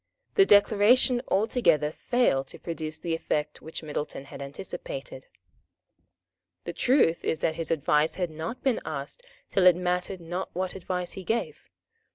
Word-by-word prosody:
The 390 Hz, -, +5 dB
Declaration 220 Hz, +5 st, +5 dB
altogether 195 Hz, -, +2 dB
failed 160 Hz, -, +1 dB
to -, -, -10 dB
produce 160 Hz, -2 st, -5 dB
the 170 Hz, -, -3 dB
effect 150 Hz, -2 st, -2 dB
which 160 Hz, +1 st, -6 dB
Middleton 150 Hz, -2 st, -4 dB
had 140 Hz, -, -10 dB
anticipated. -, -, -7 dB, 1.4 s
The -, -, -5 dB
truth 250 Hz, -, +3 dB
is 160 Hz, -, -1 dB
that 160 Hz, -, +1 dB
his 165 Hz, 0 st, -3 dB
advice 150 Hz, 0 st, +2 dB
had 180 Hz, -3 st, -2 dB
not 160 Hz, +11 st, -6 dB
been 265 Hz, -3 st, +1 dB
asked 140 Hz, -, -5 dB, 0.3 s
till 185 Hz, -2 st, +4 dB
it 180 Hz, -, +8 dB
mattered 180 Hz, +1 st, -2 dB
not 175 Hz, +3 st, -4 dB
what 185 Hz, 0 st, -2 dB
advice 180 Hz, -1 st, -4 dB
he 190 Hz, -, -7 dB
gave. 225 Hz, +5 st, -3 dB
180 Hz, 150 wpm, -27 LUFS, 155-215 Hz, 1.4 s, it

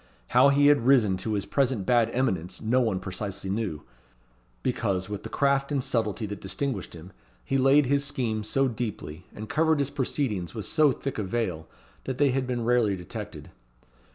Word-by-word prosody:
How 140 Hz, -, +6 dB
he 140 Hz, +1 st, +4 dB
had 145 Hz, -5 st, +4 dB
risen 115 Hz, -8 st, +5 dB
to 105 Hz, +4 st, -3 dB
his 100 Hz, -2 st, -1 dB
present 125 Hz, -2 st, 0 dB
bad 120 Hz, 0 st, +3 dB
eminence 95 Hz, -9 st, -1 dB
no 125 Hz, +4 st, +2 dB
one 110 Hz, -6 st, 0 dB
precisely 95 Hz, 0 st, -4 dB
knew; 95 Hz, -8 st, -3 dB, 0.8 s
because, 95 Hz, -1 st, -1 dB
with 105 Hz, -1 st, -4 dB
the -, -, -8 dB
craft 140 Hz, 0 st, +1 dB
and 140 Hz, -3 st, 0 dB
subtlety 110 Hz, -3 st, -1 dB
that 105 Hz, -1 st, -6 dB
distinguished 100 Hz, -2 st, -3 dB
him, 85 Hz, +3 st, -11 dB, 0.3 s
he 135 Hz, -, +1 dB
laid 135 Hz, +2 st, +5 dB
his 140 Hz, +2 st, +2 dB
schemes 110 Hz, -6 st, -2 dB
so 135 Hz, 0 st, +2 dB
deeply, 110 Hz, -10 st, -5 dB
and 110 Hz, +1 st, -7 dB
covered 160 Hz, +3 st, +2 dB
his 140 Hz, -1 st, -1 dB
proceedings 120 Hz, -, -2 dB
with 110 Hz, -, -4 dB
so 155 Hz, -3 st, +3 dB
thick 135 Hz, -1 st, -4 dB
a -, -, -1 dB
veil, 95 Hz, -5 st, -2 dB, 0.4 s
that 130 Hz, -1 st, -3 dB
they 140 Hz, -1 st, +3 dB
had 130 Hz, 0 st, -1 dB
been 120 Hz, -2 st, -2 dB
rarely 120 Hz, -4 st, +3 dB
detected. 90 Hz, -2 st, -8 dB
115 Hz, 180 wpm, -27 LUFS, 100-135 Hz, 0.8 s, How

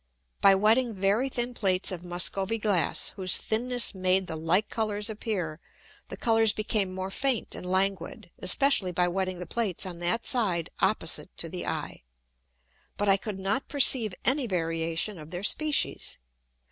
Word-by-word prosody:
By 195 Hz, -1 st, +6 dB
wetting 220 Hz, +4 st, +2 dB
very 200 Hz, +7 st, 0 dB
thin 245 Hz, -1 st, -2 dB
Plates 190 Hz, -5 st, 0 dB
of 180 Hz, -2 st, -7 dB
Muscovy 185 Hz, +4 st, +2 dB
Glass, 200 Hz, -8 st, 0 dB
whose 185 Hz, -2 st, +2 dB
thinness 245 Hz, +1 st, +2 dB
made 185 Hz, 0 st, +1 dB
the 160 Hz, -, -5 dB
like 165 Hz, +6 st, 0 dB
Colours 215 Hz, -1 st, -2 dB
appear, 190 Hz, -8 st, -4 dB, 0.5 s
the -, -, -8 dB
Colours 225 Hz, -2 st, +2 dB
became 210 Hz, -3 st, -1 dB
more 190 Hz, +1 st, -5 dB
faint 265 Hz, +1 st, -1 dB
and 180 Hz, -, -7 dB
languid, 190 Hz, +1 st, -2 dB
especially 200 Hz, -1 st, +2 dB
by 180 Hz, 0 st, 0 dB
wetting 185 Hz, 0 st, -2 dB
the 180 Hz, -, -7 dB
Plates 210 Hz, -4 st, -2 dB
on 175 Hz, -2 st, -7 dB
that 175 Hz, +7 st, -1 dB
side 190 Hz, -9 st, +1 dB
opposite -, -, +1 dB
to -, -, -3 dB
the -, -, -6 dB
Eye: -, -, -5 dB, 1.0 s
But 205 Hz, 0 st, 0 dB
I 195 Hz, -, +5 dB
could 200 Hz, 0 st, -6 dB
not 195 Hz, +7 st, -2 dB
perceive 250 Hz, -8 st, +5 dB
any 260 Hz, +2 st, +2 dB
variation 165 Hz, +1 st, -2 dB
of 155 Hz, 0 st, -11 dB
their 175 Hz, +2 st, -6 dB
Species. 300 Hz, +6 st, 0 dB
195 Hz, 160 wpm, -27 LUFS, 180-225 Hz, 1.0 s, By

